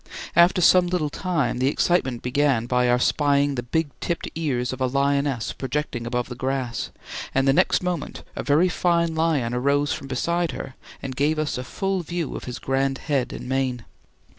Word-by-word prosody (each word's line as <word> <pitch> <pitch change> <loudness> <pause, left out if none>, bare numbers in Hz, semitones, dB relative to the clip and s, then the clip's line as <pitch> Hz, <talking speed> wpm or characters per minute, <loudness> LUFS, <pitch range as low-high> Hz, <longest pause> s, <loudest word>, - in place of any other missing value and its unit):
After 175 +2 +5
some 180 +1 +6
little 175 -5 -1
time 170 -9 -1
the 130 - +2
excitement 135 -5 +1
began 125 -2 +1
by 125 0 +2
our 120 - +4
spying 145 +2 +2
the 125 - -2
black 160 +7 0
tipped 170 - -2
ears 130 -6 -1
of 130 - -7
a 130 - +3
lioness 140 -1 0
projecting 130 -3 -3
above 125 0 -1
the 125 - -6
grass, 130 -1 -2 0.5
and 135 0 +3
the 135 - +5
next 150 - +3
moment 180 -4 -3
a - - -3
very 150 +7 +3
fine 170 -2 +1
lion 160 -7 +1
arose 140 +3 +1
from 135 - -6
beside 170 +4 -1
her 130 - -6 0.3
and 130 -2 -4
gave 150 +4 +1
us 155 -1 -1
a 125 - -4
full 195 +7 -2
view 170 -2 -4
of - - -6
his 125 - -5
grand 135 0 0
head 135 -4 -1
and - - -7
mane. 130 -2 -1
140 Hz, 190 wpm, -24 LUFS, 125-160 Hz, 0.5 s, some